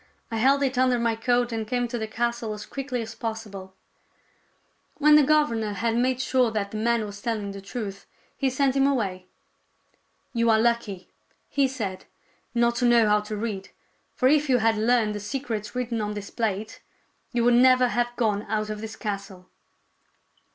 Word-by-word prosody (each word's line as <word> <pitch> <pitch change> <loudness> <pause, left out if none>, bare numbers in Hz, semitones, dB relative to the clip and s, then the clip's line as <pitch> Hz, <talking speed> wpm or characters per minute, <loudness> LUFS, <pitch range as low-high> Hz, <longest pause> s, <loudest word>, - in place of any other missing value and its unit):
I 225 - -2
held 275 +5 +3
it 260 -2 0
under 255 -1 +3
my 235 -1 +1
coat 245 +1 +1
and 220 -1 -3
came 245 0 0
to 240 0 -3
the 220 - -3
castle 235 0 -2
as 210 - -8
quickly 265 -3 -4
as 225 +1 -8
possible." 210 -4 -6 1.2
When 300 0 +5
the 300 - +8
governor 265 -8 +2
had 230 +2 -1
made 250 +1 +1
sure 260 -2 +2
that 210 -2 -3
the 215 - -4
man 230 0 +1
was 205 0 -9
telling 215 -4 -2
the 195 0 -8
truth, 200 -2 -6 0.3
he 270 - 0
sent 265 +1 +1
him 275 0 +4
away. 195 -9 -1 0.5
" - - -43
You 230 -1 +2
are 220 - +5
lucky," 220 -5 0 0.4
he 280 -1 +2
said, 210 -8 -5 0.3
" - - -40
not 235 0 +2
to 245 - +1
know 235 -2 +5
how 210 0 +4
to 210 0 -5
read. 205 -3 -4 0.5
For 255 - +3
if 300 +1 +3
you 255 - +5
had 225 -1 +2
learned 220 0 +2
the 210 - -4
secrets 215 -2 -4
written 240 -3 -2
on 210 0 -3
this 205 -1 -7
plate, 215 -2 -3 0.5
you 240 -1 0
would 240 +1 +5
never 255 0 +5
have 240 0 +1
gone 210 -4 +1
out 215 0 -1
of 210 0 -5
this 220 -1 -6
castle." 200 -3 -6
230 Hz, 190 wpm, -25 LUFS, 210-250 Hz, 1.2 s, the